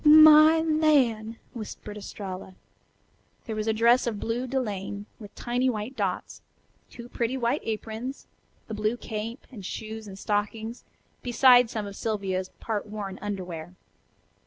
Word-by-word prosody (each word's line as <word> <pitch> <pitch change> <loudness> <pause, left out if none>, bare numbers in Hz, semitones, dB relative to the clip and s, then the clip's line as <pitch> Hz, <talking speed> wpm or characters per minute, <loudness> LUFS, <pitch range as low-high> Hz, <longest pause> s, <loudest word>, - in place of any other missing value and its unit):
"My 310 +1 +9
lan'!" 275 -9 +2 0.2
whispered 215 -2 -7
Estralla. 190 -2 -7 0.9
There 225 - -4
was 215 0 -2
a - - +4
dress 235 +3 +4
of 215 -3 -2
blue 240 +4 -2
delaine 205 -6 -3
with 205 -3 -11
tiny 245 +2 0
white 225 +2 -3
dots, - - -3 0.5
two 235 -1 -10
pretty 245 +1 -1
white 245 +3 0
aprons, 225 +4 -4 0.4
the 220 - -6
blue 215 +2 0
cape, 225 +2 -5
and 215 -6 -9
shoes 220 +3 -6
and 190 -1 -9
stockings, 215 +3 -2 0.4
beside 245 -1 +6
some 215 -3 -3
of 200 -1 -7
Sylvia's 195 -4 -2
part 215 -2 -3
worn 205 -2 -6
underwear. 180 -4 -5
220 Hz, 135 wpm, -27 LUFS, 205-245 Hz, 0.9 s, My